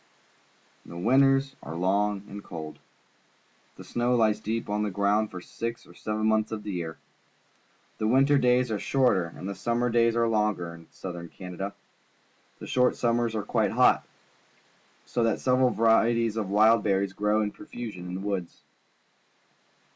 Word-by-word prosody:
The 85 Hz, -, -10 dB
winters 135 Hz, +6 st, +3 dB
are 80 Hz, -, -7 dB
long 100 Hz, +3 st, 0 dB
and 100 Hz, 0 st, -9 dB
cold. 80 Hz, -3 st, -8 dB, 1.0 s
The -, -, -11 dB
snow 120 Hz, +1 st, 0 dB
lies 110 Hz, -3 st, +2 dB
deep 110 Hz, +2 st, -3 dB
on 105 Hz, +1 st, -1 dB
the 105 Hz, -, 0 dB
ground 100 Hz, +2 st, +1 dB
for 90 Hz, -, -8 dB
six 115 Hz, +5 st, -6 dB
or -, -, -16 dB
seven 110 Hz, 0 st, -3 dB
months 110 Hz, 0 st, +2 dB
of 110 Hz, -1 st, -5 dB
the 105 Hz, -, -5 dB
year. 85 Hz, -3 st, -4 dB, 1.0 s
The 110 Hz, -, 0 dB
winter 135 Hz, +4 st, +4 dB
days 125 Hz, -1 st, +2 dB
are 105 Hz, -, -1 dB
shorter 125 Hz, -10 st, +2 dB
and 85 Hz, +3 st, -8 dB
the 100 Hz, -, -3 dB
summer 120 Hz, +3 st, -1 dB
days 115 Hz, 0 st, +3 dB
are 115 Hz, 0 st, +2 dB
longer 105 Hz, -6 st, 0 dB
than 85 Hz, -, -11 dB
in 85 Hz, -, -17 dB
Southern 85 Hz, -2 st, -8 dB
Canada. 95 Hz, +2 st, -7 dB, 0.8 s
The -, -, -9 dB
short 125 Hz, 0 st, +2 dB
sum 120 Hz, -1 st, +1 dB
mers 120 Hz, -2 st, -1 dB
are 105 Hz, -, -1 dB
quite -, -, 0 dB
hot, -, -, +4 dB, 1.0 s
so 120 Hz, -, -2 dB
that 115 Hz, -1 st, +1 dB
several 130 Hz, 0 st, +3 dB
varieties 115 Hz, 0 st, +3 dB
of 105 Hz, -4 st, -2 dB
wild 110 Hz, +2 st, +4 dB
berries 100 Hz, -1 st, 0 dB
grow 105 Hz, +2 st, +1 dB
in 105 Hz, -, -2 dB
profusion 115 Hz, -12 st, -8 dB
in 90 Hz, -, -5 dB
the 95 Hz, -, -5 dB
woods. 100 Hz, -4 st, -4 dB
110 Hz, 170 wpm, -27 LUFS, 100-120 Hz, 1.0 s, winter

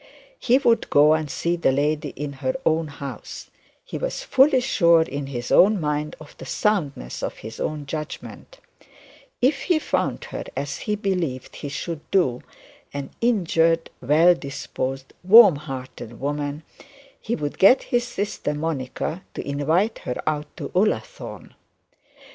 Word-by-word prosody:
He 250 Hz, +1 st, +4 dB
would 240 Hz, -4 st, +2 dB
go 150 Hz, +2 st, +6 dB
and 155 Hz, -2 st, -1 dB
see 170 Hz, +5 st, -1 dB
the 170 Hz, -5 st, +2 dB
lady 150 Hz, +2 st, 0 dB
in 145 Hz, 0 st, -5 dB
her 130 Hz, -1 st, 0 dB
own 160 Hz, 0 st, +2 dB
house; 140 Hz, -1 st, -8 dB, 0.3 s
he -, -, -6 dB
was -, -, -3 dB
fully 270 Hz, 0 st, +4 dB
sure 170 Hz, -10 st, +4 dB
in 140 Hz, -2 st, -5 dB
his 120 Hz, -3 st, -5 dB
own 205 Hz, +2 st, +6 dB
mind 150 Hz, -1 st, -2 dB
of 155 Hz, -1 st, -13 dB
the -, -, -8 dB
soundness 150 Hz, -, -1 dB
of -, -, -4 dB
his 110 Hz, -, -8 dB
own 150 Hz, -1 st, -3 dB
judgment; 155 Hz, -, -7 dB, 0.9 s
if 275 Hz, +2 st, +3 dB
he 350 Hz, -3 st, +3 dB
found 310 Hz, -, -1 dB
her, -, -, -5 dB
as -, -, -3 dB
he 210 Hz, -, +2 dB
believed 180 Hz, -, -3 dB
he 145 Hz, -, -6 dB
should 155 Hz, +3 st, -4 dB
do, 130 Hz, -11 st, +2 dB, 0.5 s
an 140 Hz, -1 st, -6 dB
injured 165 Hz, -8 st, +2 dB
well 155 Hz, +7 st, +5 dB
disposed, 135 Hz, -4 st, -5 dB
warm 200 Hz, -4 st, +8 dB
hearted 130 Hz, -5 st, -8 dB
woman, 145 Hz, +2 st, -3 dB, 0.6 s
he 235 Hz, -, -2 dB
would 145 Hz, -2 st, -4 dB
get 200 Hz, +8 st, +6 dB
his 245 Hz, 0 st, +2 dB
sister 205 Hz, -9 st, -3 dB
Monica 155 Hz, +2 st, -3 dB
to -, -, -5 dB
invite 160 Hz, +10 st, +1 dB
her 125 Hz, -, -4 dB
out 150 Hz, -1 st, -1 dB
to -, -, -5 dB
Ullathorne. 215 Hz, -, -2 dB
155 Hz, 150 wpm, -23 LUFS, 145-200 Hz, 0.9 s, warm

